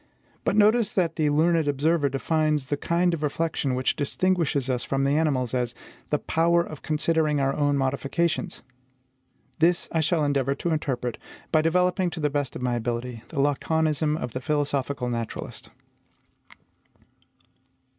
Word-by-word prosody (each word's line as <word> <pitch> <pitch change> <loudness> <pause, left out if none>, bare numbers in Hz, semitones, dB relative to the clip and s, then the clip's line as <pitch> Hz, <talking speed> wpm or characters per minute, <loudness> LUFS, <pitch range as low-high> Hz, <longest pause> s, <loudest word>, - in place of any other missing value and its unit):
But - - +1
notice 215 +1 +4
that 170 -4 +1
the 155 -2 +1
learned 160 +1 +2
observer 145 +1 +2
defines 150 +1 0
the 145 - -1
kind 170 +4 +1
of 165 - -3
reflection 150 -3 -1
which 130 0 0
distinguishes 150 -3 0
us 125 -2 -1
from 135 0 -1
the 140 - +2
animals 140 -6 +1
as 125 -2 -1 0.3
the 150 - +2
POWER 170 +3 +2
OF 155 -4 -9
CONSIDERING 155 -1 +1
OUR 135 0 +1
OWN 145 -1 +1
MODIFICATIONS. 140 +5 -1 1.0
This 170 +2 +3
I 165 - +1
shall 160 0 +1
endeavour 140 -1 +1
to 170 +4 -2
interpret, 125 -6 -2 0.3
by 155 - +4
developing 180 +2 +2
to 170 - -7
the 150 -2 0
best 145 -2 -2
of - - -5
my 125 -1 0
ability 120 0 -3
the 160 - -9
laconism 150 +2 +1
of 125 -7 -5
the 130 - -4
philosophical 140 -2 -1
naturalist. 115 -2 -5
150 Hz, 150 wpm, -25 LUFS, 135-165 Hz, 1.0 s, notice